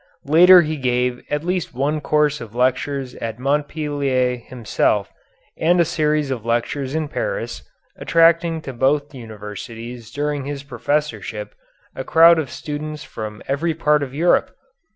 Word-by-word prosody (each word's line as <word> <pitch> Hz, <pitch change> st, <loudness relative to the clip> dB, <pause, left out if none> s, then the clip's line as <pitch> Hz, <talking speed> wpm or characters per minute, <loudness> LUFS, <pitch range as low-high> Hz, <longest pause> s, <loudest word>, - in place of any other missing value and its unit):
Later 175 Hz, +4 st, +8 dB
he 155 Hz, 0 st, -3 dB
gave 125 Hz, -1 st, 0 dB
at 150 Hz, +1 st, -1 dB
least 180 Hz, -6 st, -2 dB
one 145 Hz, +4 st, 0 dB
course 150 Hz, 0 st, +1 dB
of 115 Hz, -1 st, -10 dB
lectures 130 Hz, +1 st, 0 dB
at 115 Hz, -1 st, -5 dB
Montpellier 140 Hz, -2 st, 0 dB
himself 110 Hz, -4 st, -1 dB, 0.5 s
and 175 Hz, +2 st, +3 dB
a 170 Hz, -, +5 dB
series 150 Hz, -3 st, 0 dB
of 120 Hz, -5 st, -3 dB
lectures 125 Hz, +4 st, -1 dB
in 160 Hz, -1 st, -1 dB
Paris, -, -, -3 dB, 0.4 s
attracting 165 Hz, 0 st, +3 dB
to 135 Hz, -, -7 dB
both 140 Hz, +4 st, +1 dB
universities 115 Hz, +1 st, -8 dB
during 145 Hz, -1 st, -2 dB
his 140 Hz, -1 st, -5 dB
professorship 120 Hz, -6 st, -3 dB, 0.4 s
a 130 Hz, -, -4 dB
crowd 165 Hz, +3 st, +6 dB
of 145 Hz, -5 st, -3 dB
students 150 Hz, +3 st, -6 dB
from 105 Hz, -1 st, -7 dB
every 155 Hz, +4 st, -1 dB
part 150 Hz, -2 st, +2 dB
of 140 Hz, -2 st, -4 dB
Europe. 165 Hz, +6 st, +2 dB
145 Hz, 140 wpm, -21 LUFS, 125-155 Hz, 0.5 s, Later